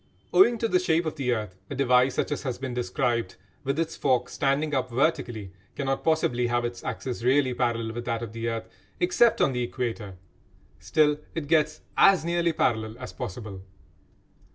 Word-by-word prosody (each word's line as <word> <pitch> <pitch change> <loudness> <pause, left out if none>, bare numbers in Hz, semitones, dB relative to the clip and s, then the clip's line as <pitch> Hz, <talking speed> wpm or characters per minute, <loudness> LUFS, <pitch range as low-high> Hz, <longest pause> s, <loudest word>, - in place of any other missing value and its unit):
Owing 245 -11 +6
to 230 - 0
the 180 - +3
shape 170 -2 +1
of 155 - -2
the 135 -4 -1
earth, 105 -5 -3
a 140 - -4
device 125 -1 +3
such - - -1
as 145 - -2
has 130 -3 -3
been 130 -1 -5
described, 120 -1 -1 0.3
with 140 +1 -1
its 165 0 -1
fork 130 -3 +1
standing 145 +2 0
up 130 -2 0
vertically, 120 - -1 0.2
cannot 135 -1 -2
possibly 125 -7 +1
have 120 0 0
its 120 0 -5
axis 125 -3 -4
really 130 +1 +3
parallel 115 -2 -1
with 120 +1 -5
that 115 -1 -2
of 110 -2 -7
the 115 0 -2
earth, 115 -1 -4 0.3
except 345 -10 +3
on 135 - +3
the 125 - -1
Equator. 115 -5 -4 0.6
Still 150 -1 +2 0.2
it 165 -3 -3
gets 155 -1 +2 0.2
as 185 -5 +6
nearly 170 0 +1
parallel 110 -7 0
as 125 0 -8
possible. 95 -1 -6
130 Hz, 180 wpm, -26 LUFS, 120-150 Hz, 0.6 s, Owing